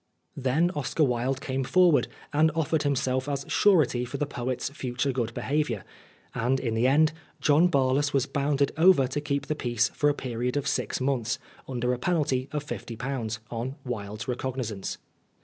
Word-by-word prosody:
Then 140 +6 +1
Oscar 145 -1 0
Wilde 130 +1 0
came 135 -1 -2
forward 175 +2 +4 0.3
and 155 +2 +4
offered 160 -1 +1
himself 130 -1 0
as 140 -1 -2
surety 155 -12 +3
for 125 +3 -5
the 145 - 0
poet's 130 -1 -3
future 130 -1 -2
good 120 -3 -2
behaviour; 135 -8 -1 0.5
and 130 +3 +1
in 115 -4 -2
the 115 +3 +2
end, 155 +3 +4 0.3
John 155 +4 +4
Barlas 140 -1 +2
was 135 -2 +2
bound 140 0 +1
over 165 -5 +6
to 135 +3 -3
keep 140 -1 -2
the - - -1
peace 120 -4 0
for 145 - +1
a 145 - +1
period 125 0 -2
of 140 -1 -1
six - - -1
months, 125 -3 0 0.3
under 125 -1 -1
a 125 - -3
penalty 135 -5 0
of 150 -1 -3
^50, 120 -4 -4
on 120 +3 -3
Wilde's 110 -2 -5
recognisance. 125 -5 -3
135 Hz, 165 wpm, -27 LUFS, 125-145 Hz, 0.5 s, over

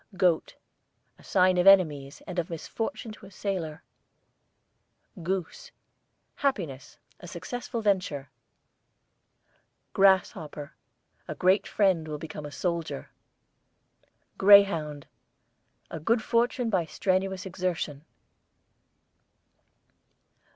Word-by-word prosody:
GOAT, 175 -3 +1 0.6
a - - -18
sign 185 -1 +3
of 180 - +3
enemies, 150 -8 +4
and 180 -1 -4
of 170 - -3
misfortune 225 - -5
to 205 -2 -12
a - - -13
sailor. 180 -5 -4 1.4
GOOSE, 190 - -4 0.7
happiness; 165 - -2 0.2
a 175 - -11
successful 235 +7 -5
venture. 180 -9 0 1.6
GRASSHOPPER, 185 -6 +2 0.5
a - - -5
great 185 +3 +2
friend 185 -6 +1
will 150 -1 -4
become 150 -1 -7
a - - -10
soldier. 170 - -3 1.3
GREYHOUND, 180 -8 +5 0.9
a - - -5
good 220 +8 +1
fortune 235 +1 +1
by 185 -4 +2
strenuous 190 +3 -1
exertion. 175 -6 -3
185 Hz, 90 wpm, -27 LUFS, 160-200 Hz, 1.6 s, GREYHOUND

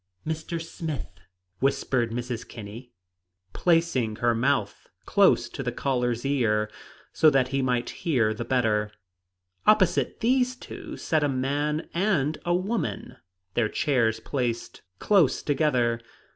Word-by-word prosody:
"Mr. 160 +1 -3
Smith," 160 - -5 0.5
whispered 130 -3 +1
Mrs. 120 0 -4
Kinney, 115 +3 -9 0.6
placing 165 -10 +1
her 120 +1 +2
mouth 115 -3 0 0.2
close - - +4
to - - -6
the - - -2
caller's 125 -2 -1
ear, 105 -6 +1 0.4
so 155 - +6
that 135 -3 +2
he 135 0 0
might 125 -2 0
hear 120 -10 +2
the 110 - -4
better. 110 -4 +1 0.8
Opposite 190 -4 +3
these 255 +1 +2
two - - -9
sat 155 -2 0
a 145 - +2
man 145 +4 -1
and 170 -6 +1
a 175 0 +2
woman, 190 0 -3 0.4
their 115 -3 +1
chairs 115 -6 +1
placed 120 0 -3 0.2
close 190 -10 +3
together. 125 -6 +1
135 Hz, 125 wpm, -26 LUFS, 120-160 Hz, 0.8 s, so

